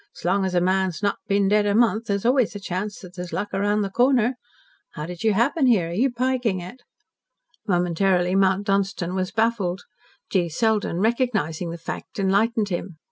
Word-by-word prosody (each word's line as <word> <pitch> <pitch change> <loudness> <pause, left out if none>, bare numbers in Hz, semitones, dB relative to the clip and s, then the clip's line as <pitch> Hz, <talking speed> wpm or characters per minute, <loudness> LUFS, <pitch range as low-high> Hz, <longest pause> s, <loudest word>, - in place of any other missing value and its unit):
S'long 190 +3 0
as 185 -1 -2
a 175 - +3
man's 185 0 0
not 200 - 0
been 200 -1 +2
dead 205 +1 +3
a 205 - +1
month, 225 -1 +2
there's 200 +1 -1
always 250 -4 +2
a - - -4
chance 200 +2 -4
that 180 -1 -12
there's 180 -2 -7
luck 205 0 -3
round 205 +2 +1
the 195 - -2
corner. 245 +1 +3 0.6
How 150 - -5
did 175 +3 -7
you 220 -1 +3
happen 265 +7 +2
here? 195 -9 +3
Are - - -5
you 245 +9 +2
piking 245 -5 0
it?" 185 +9 -10 0.9
Momentarily 180 0 +1
Mount 195 +1 +2
Dunstan 195 -3 0
was 185 -1 -1
baffled. 220 -5 0 0.5
G. 175 -3 +1
Selden, 210 0 0
recognising 220 - 0
the 170 - -5
fact, 165 - -7
enlightened 205 +2 +1
him. 175 -2 -4
200 Hz, 185 wpm, -23 LUFS, 180-225 Hz, 0.9 s, a